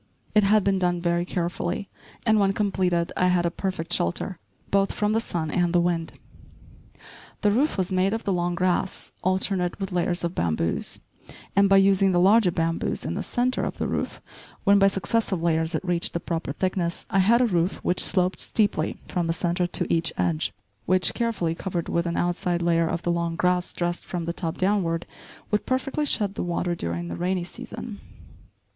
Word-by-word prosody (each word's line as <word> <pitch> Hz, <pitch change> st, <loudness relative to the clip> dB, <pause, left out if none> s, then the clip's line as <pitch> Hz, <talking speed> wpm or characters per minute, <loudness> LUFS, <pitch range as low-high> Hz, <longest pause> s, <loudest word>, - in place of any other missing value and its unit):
It 210 Hz, -, +5 dB
had 210 Hz, +1 st, +4 dB
been 195 Hz, -1 st, +2 dB
done 175 Hz, -1 st, +1 dB
very 170 Hz, 0 st, 0 dB
carefully, 175 Hz, +2 st, -2 dB, 0.4 s
and, 220 Hz, -1 st, +4 dB
when 195 Hz, -1 st, +3 dB
completed, 185 Hz, -4 st, 0 dB
I 180 Hz, -, +2 dB
had 180 Hz, -1 st, +2 dB
a 170 Hz, -, +1 dB
perfect 175 Hz, -2 st, -3 dB
shelter, 160 Hz, -, -1 dB, 0.3 s
both 195 Hz, 0 st, +3 dB
from 210 Hz, 0 st, 0 dB
the 225 Hz, -, +3 dB
sun 165 Hz, -8 st, -3 dB
and 175 Hz, -1 st, +1 dB
the 175 Hz, -, +5 dB
wind. 170 Hz, -1 st, 0 dB, 1.3 s
The 210 Hz, -, +3 dB
roof 270 Hz, +7 st, +1 dB
was 185 Hz, -1 st, -1 dB
made 185 Hz, +1 st, +2 dB
of 225 Hz, +1 st, -2 dB
the 195 Hz, -, 0 dB
long 175 Hz, 0 st, 0 dB
grass, 185 Hz, +1 st, 0 dB
alternate 185 Hz, 0 st, 0 dB
with 195 Hz, -1 st, -3 dB
layers 175 Hz, 0 st, 0 dB
of 170 Hz, 0 st, -1 dB
bamboos; 85 Hz, -, -1 dB, 0.5 s
and 200 Hz, 0 st, +5 dB
by 195 Hz, -, +6 dB
using 195 Hz, 0 st, +4 dB
the 175 Hz, -, +3 dB
larger 200 Hz, +2 st, +5 dB
bamboos 165 Hz, -1 st, -1 dB
in -, -, -2 dB
the -, -, -2 dB
centre 250 Hz, +1 st, 0 dB
of -, -, -3 dB
the -, -, -1 dB
roof, -, -, -3 dB, 0.4 s
when 200 Hz, 0 st, +5 dB
by 195 Hz, -, +6 dB
successive 195 Hz, -1 st, 0 dB
layers 160 Hz, 0 st, +1 dB
it -, -, -3 dB
reached 175 Hz, -1 st, 0 dB
the 170 Hz, -, -1 dB
proper 165 Hz, -3 st, -3 dB
thickness, 180 Hz, +1 st, -2 dB
I 195 Hz, -, +3 dB
had 220 Hz, +5 st, +5 dB
a 250 Hz, -, +4 dB
roof 180 Hz, -4 st, +1 dB
which 180 Hz, -, +2 dB
sloped 185 Hz, -1 st, +1 dB
steeply 205 Hz, -7 st, 0 dB
from 175 Hz, -2 st, -1 dB
the 165 Hz, -, +1 dB
centre 175 Hz, +1 st, 0 dB
to -, -, -1 dB
each 165 Hz, -1 st, +2 dB
edge, 85 Hz, -3 st, 0 dB, 0.4 s
which, 185 Hz, 0 st, +3 dB
carefully 225 Hz, -9 st, -1 dB
covered 175 Hz, -1 st, -4 dB
with 170 Hz, 0 st, 0 dB
an 170 Hz, -, -2 dB
outside 175 Hz, 0 st, 0 dB
layer 165 Hz, -1 st, +3 dB
of 170 Hz, -, -3 dB
the 175 Hz, -, +1 dB
long 170 Hz, -1 st, -1 dB
grass 180 Hz, +1 st, +1 dB
dressed 175 Hz, 0 st, -2 dB
from 175 Hz, -2 st, -4 dB
the 170 Hz, -, -2 dB
top 165 Hz, -2 st, -4 dB
downward, 185 Hz, -4 st, +1 dB, 0.5 s
would 210 Hz, -, 0 dB
perfectly 275 Hz, +3 st, 0 dB
shed 205 Hz, -7 st, +1 dB
the -, -, -4 dB
water 175 Hz, 0 st, -1 dB
during 85 Hz, -, -3 dB
the 85 Hz, -, -4 dB
rainy 180 Hz, 0 st, -1 dB
season. 220 Hz, +2 st, -8 dB
180 Hz, 195 wpm, -25 LUFS, 170-195 Hz, 1.3 s, by